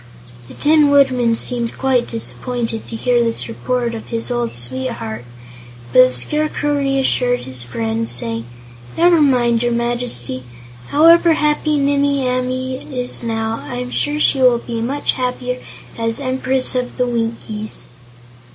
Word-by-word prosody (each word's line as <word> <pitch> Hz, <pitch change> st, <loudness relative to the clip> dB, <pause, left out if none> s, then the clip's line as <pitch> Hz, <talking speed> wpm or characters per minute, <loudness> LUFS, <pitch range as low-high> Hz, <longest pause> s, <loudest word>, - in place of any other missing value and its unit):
The 130 Hz, -, -12 dB
Tin 300 Hz, -1 st, +4 dB
Woodman 255 Hz, -5 st, +3 dB
seemed 235 Hz, 0 st, -2 dB
quite 260 Hz, -2 st, +1 dB
disappointed 230 Hz, 0 st, -3 dB
to -, -, -6 dB
hear 240 Hz, +1 st, +2 dB
this 230 Hz, -1 st, -2 dB
report 240 Hz, +1 st, -2 dB
of 225 Hz, -, -7 dB
his 230 Hz, +1 st, -3 dB
old 240 Hz, -, -2 dB
sweetheart, 120 Hz, -2 st, -3 dB, 0.7 s
but 125 Hz, -, +8 dB
the -, -, -5 dB
Scarecrow 295 Hz, -, -1 dB
reassured 270 Hz, -3 st, +1 dB
his 130 Hz, -2 st, -5 dB
friend, 115 Hz, -1 st, -3 dB
saying: 115 Hz, -1 st, -2 dB, 0.5 s
"Never 340 Hz, -1 st, +5 dB
mind, 240 Hz, -5 st, +3 dB
your 240 Hz, 0 st, +1 dB
Majesty; 235 Hz, -, -2 dB, 0.5 s
however 335 Hz, +2 st, +6 dB
happy 300 Hz, 0 st, +1 dB
Nimmie 280 Hz, -1 st, +1 dB
Amee 255 Hz, +1 st, -2 dB
is 250 Hz, -1 st, -3 dB
now, 225 Hz, -1 st, -2 dB
I'm 250 Hz, 0 st, -5 dB
sure 295 Hz, +1 st, 0 dB
she 275 Hz, -3 st, +2 dB
will 250 Hz, -2 st, +5 dB
be 230 Hz, -1 st, -5 dB
much 275 Hz, +5 st, 0 dB
happier 250 Hz, 0 st, -3 dB, 0.4 s
as 230 Hz, +1 st, -1 dB
Empress 260 Hz, -1 st, +1 dB
of 250 Hz, -1 st, -3 dB
the 250 Hz, -, +2 dB
Winkies." 225 Hz, -2 st, -4 dB
245 Hz, 140 wpm, -18 LUFS, 225-265 Hz, 0.7 s, but